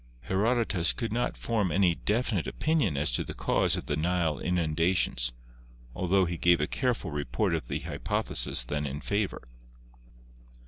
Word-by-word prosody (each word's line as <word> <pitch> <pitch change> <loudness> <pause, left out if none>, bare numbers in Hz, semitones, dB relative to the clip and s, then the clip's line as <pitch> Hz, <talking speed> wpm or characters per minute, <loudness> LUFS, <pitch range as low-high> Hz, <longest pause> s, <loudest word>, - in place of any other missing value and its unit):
Herodotus 105 -3 +2
could 115 -3 -3
not 120 +1 -1
form 105 -6 -1
any 90 0 +3
definite 105 -1 -1
opinion 150 - 0
as 75 -2 +1
to - - +1
the - - -7
cause - - +2
of - - -5
the 75 - -1
Nile 80 -1 0
inundations, 80 -7 +1 0.6
altho 95 +1 +2
he 85 0 -3
gave 85 0 +4
a 75 - +1
careful 120 - -1
report 75 - -1
of 80 -7 -2
the - - -3
hypotheses - - 0
then 75 +3 -2
in 70 +2 -5
favor. 100 0 -2
90 Hz, 150 wpm, -28 LUFS, 75-105 Hz, 0.6 s, gave